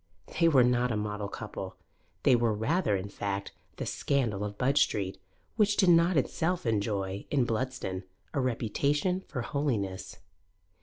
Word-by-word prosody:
They 165 - +6
were 135 -6 +6
not 125 0 +2
a 110 - 0
model 105 -1 -3
couple; 105 -4 -6 0.5
they 125 - +6
were 115 -2 +2
rather, 110 - +1
in 95 +1 -3
fact, 100 -1 -4 0.2
the - - -4
scandal 115 -8 0
of 105 0 -5
Budge 140 +5 +3
Street, 95 -2 0 0.4
which 210 -2 +3
did 190 -3 +5
not 170 0 +5
itself 165 +5 0
enjoy, 100 -3 -1
in 135 -4 +2
Bludston, 115 -5 -2 0.3
a 140 - +1
reputation 140 - 0
for 130 -7 -4
holiness. 115 -10 -2
120 Hz, 150 wpm, -29 LUFS, 105-145 Hz, 0.5 s, They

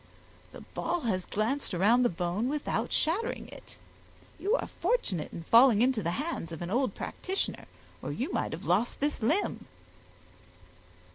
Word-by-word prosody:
the - - -10
ball 350 -1 -3
has 190 -8 -1
glanced 220 +1 -1
around 215 +8 +4
the 245 - +4
bone 180 +7 -1
without 295 0 -1
shattering 420 +10 0
it; - - -13 0.6
you 415 +5 +2
are - - -1
fortunate 195 - -1
in 165 - -7
falling 230 +3 +6
into 255 -3 +2
the 170 - -1
hands 290 - -3
of 165 +1 -5
an 175 - -5
old 255 +4 +1
practitioner, 380 +1 -3 0.4
or - - -4
you - - -3
might - - -1
have - - -6
lost 200 +7 +1
this 290 -2 -1
limb." 310 - 0
240 Hz, 155 wpm, -30 LUFS, 185-300 Hz, 0.6 s, falling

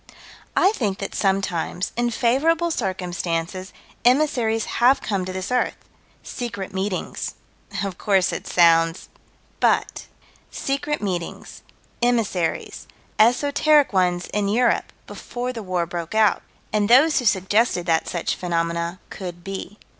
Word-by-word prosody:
I 385 - +5
think 210 - -2
that 200 - -5
sometimes, 190 -2 -1
in 240 0 +1
favorable 310 +9 +2
circumstances, 185 - -3 0.3
emissaries 245 -4 +2 0.2
have 255 +3 +6
come 195 -3 -2
to 185 - -5
this 185 +4 -5
earth 250 - +1 0.5
secret 205 -7 -5
meetings 190 0 -3 0.5
Of 195 -3 -4
course 195 -3 +2
it - - -5
sounds 165 -1 +3 0.5
But: - - +1 0.4
Secret 280 0 -2
meetings 180 -4 -4 0.4
emissaries 220 -9 -1 0.3
esoteric 285 +4 +4
ones 180 -1 +1
in 210 -1 0
Europe, 235 +4 +1
before 250 +1 -5
the 230 - -6
war 185 -3 -1
broke 170 +2 -5
out 220 -1 +4 0.3
And 210 0 +1
those 285 +6 +6
who 250 - -4
suggested 195 -1 +2
that 165 -2 +1
such 175 -1 -1
phenomena 170 0 -2
could 175 -3 -7
be. 195 +1 -6
200 Hz, 125 wpm, -22 LUFS, 180-240 Hz, 0.5 s, have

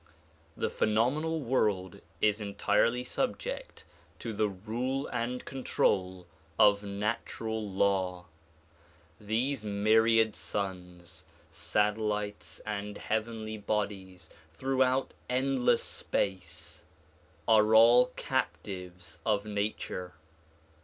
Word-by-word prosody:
The - - -1
phenomenal 145 +9 +1
world 105 -8 0 0.2
is 105 0 +3
entirely 105 +4 +1
subject - - -3 0.3
to 115 - -5
the 105 0 +1
rule 120 +8 -3
and 125 +1 -3
control 95 -8 0 0.3
of 100 -1 +5
natural 105 +2 -3
law. 95 -2 0 0.9
These 115 +4 -1
myriad 110 +2 +3
suns, 90 -3 -5 0.3
satellites 105 0 -1
and 105 -1 -4
heavenly 110 0 -3
bodies 100 -3 -3 0.2
throughout 130 +3 +1 0.2
endless 130 0 +2
space 95 -4 -3 0.6
are 110 0 +5
all 120 +3 +8
captives 90 -2 -4
of 105 -2 +1
nature. 100 -4 -3
105 Hz, 85 wpm, -30 LUFS, 100-120 Hz, 0.9 s, all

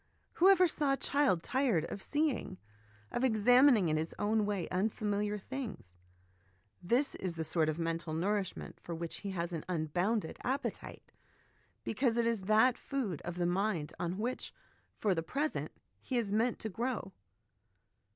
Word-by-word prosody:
Whoever 370 0 +6
saw 290 -4 +1
a - - 0
child 275 - +2
tired 250 - +1
of 200 - -6
seeing, 290 -10 -1 0.5
of 240 - -1
examining 245 -2 +5
in 155 -1 +1
his 160 +1 -3
own 210 0 +1
way, 200 -5 -1
unfamiliar 205 +1 0
things? 215 - -7 0.9
This 240 +10 +1
is 185 -3 -4
the 160 - -2
sort 160 0 +1
of 155 - -2
mental 165 -1 -2
nourishment 195 +3 -2
for 170 - -6
which 165 0 -4
he 200 - -6
has 175 -2 -3
an 160 - -3
unbounded 175 +4 -1
appetite, 265 +3 -4 0.7
because 235 0 0
it 235 - +2
is 230 -3 +1
that 215 +5 +4
food 240 - -3
of 175 - -5
the 175 -1 0
mind 175 -4 0
on 175 +2 -2
which, 240 +4 -3 0.4
for 205 -3 +1
the 165 - -1
present, 285 - -2 0.3
he 255 - -2
is 220 -4 0
meant 225 +3 +1
to 220 - -3
grow. 230 -2 -3
205 Hz, 155 wpm, -33 LUFS, 175-245 Hz, 0.9 s, Whoever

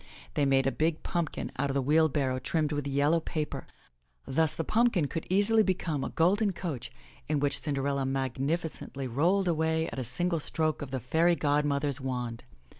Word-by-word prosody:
They 145 -2 +2
made 135 -1 +3
a 135 - +2
big 155 +4 0
pumpkin 170 -3 -2
out 140 +1 +1
of 135 - -2
the 140 - +2
wheelbarrow 145 -3 +2
trimmed 155 +3 0
with 145 -1 -2
yellow 145 +4 +2
paper. 155 -2 -4 0.6
Thus 160 +3 +1
the 165 - -2
pumpkin 225 -5 +2
could 165 +3 -5
easily 205 +4 +4
become 175 -8 -1
a - - -2
golden 195 +5 +2
coach 155 -10 -5 0.4
in 150 -1 +1
which 145 0 +2
Cinderella 140 -1 -1
magnificently 135 +2 -2
rolled 170 +10 +2
away 160 -1 +1
at - - -6
a - - -2
single 165 +9 -1
stroke 155 +1 -1
of 145 - -5
the 130 0 -2
fairy 165 +8 +2
godmother's 145 -2 0
wand. 125 -2 -4
150 Hz, 175 wpm, -29 LUFS, 135-165 Hz, 0.6 s, easily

